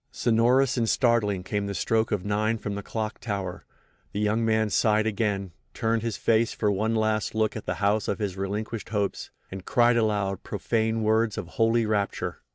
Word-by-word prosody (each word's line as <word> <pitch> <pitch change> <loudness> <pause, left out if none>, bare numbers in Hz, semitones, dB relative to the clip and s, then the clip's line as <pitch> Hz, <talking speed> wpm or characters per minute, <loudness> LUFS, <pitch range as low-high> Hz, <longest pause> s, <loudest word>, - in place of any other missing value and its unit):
Sonorous 125 +3 +2
and 115 -2 +1
startling 110 -6 +2
came 100 +1 -2
the 100 - -4
stroke 110 +2 +1
of 100 -3 -1
9 110 +2 +1
from 105 -1 -4
the 100 - -4
clock 110 +2 -4
tower. 100 -5 -4 0.5
The 100 - -2
young 105 +2 +1
man 110 -1 +1
sighed 110 +1 +3
again, 100 -3 -1 0.2
turned 115 0 0
his 115 -2 -3
face 115 0 +2
for 105 -2 0
one 110 +3 0
last 110 -1 0
look 110 -1 +1
at 110 - -7
the - - -1
house 105 +1 +1
of 100 - -1
his 100 -4 -3
relinquished 105 +3 -4
hopes—and 100 -2 -4
cried 120 0 +3
aloud 105 -4 0
profane 110 0 -1
words 110 0 +2
of 85 - -5
holy 115 +2 +2
rapture. 105 -2 -2
110 Hz, 180 wpm, -26 LUFS, 100-115 Hz, 0.5 s, sighed